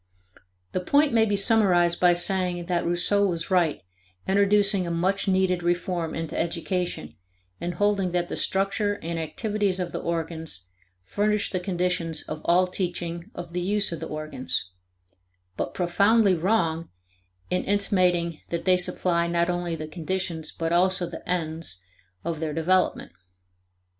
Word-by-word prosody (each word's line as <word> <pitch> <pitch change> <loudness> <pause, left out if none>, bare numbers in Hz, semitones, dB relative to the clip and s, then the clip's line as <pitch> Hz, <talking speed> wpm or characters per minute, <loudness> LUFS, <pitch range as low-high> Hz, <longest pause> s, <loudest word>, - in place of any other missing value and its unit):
The - - -1
point 285 +9 +3
may 225 -1 +5
be 205 -2 +1
summarized 195 -5 +4
by 175 -1 +5
saying 175 0 +1
that 175 -1 0
Rousseau 200 +4 +3
was 170 0 -3
right, 170 - +2 0.4
introducing 200 -1 +3
a - - -2
much 185 +4 0
needed 185 -2 +2
reform 175 -1 -1
into 165 -1 -4
education, 170 - -2 0.5
in 175 - -3
holding 200 0 +1
that 175 0 0
the - - -4
structure 200 +2 0
and 165 0 -3
activities 205 +3 -1
of 175 -2 -3
the - - -3
organs 160 - -3 0.3
furnish 210 - 0
the 185 - -1
conditions 180 -3 -1
of 155 0 -6
all 180 +2 +4
teaching 175 -1 -4
of 175 -1 -7
the 180 - -1
use 205 +2 0
of 170 - -4
the 160 - -5
organs; 155 -10 -4 0.8
but - - -4
profoundly 200 +4 +3
wrong 165 -2 0 0.6
in 180 - +1
intimating 180 -5 +1
that 170 - -3
they 185 -1 +5
supply 170 -1 +1
not 170 +1 +1
only 175 -1 -2
the 155 -1 -6
conditions 170 0 -3
but 165 0 -2
also 185 +1 +2
the 170 - -8
ends 160 - -2 0.4
of 165 -1 -3
their 155 -2 -2
development. 180 +4 +1
175 Hz, 150 wpm, -25 LUFS, 170-190 Hz, 0.8 s, may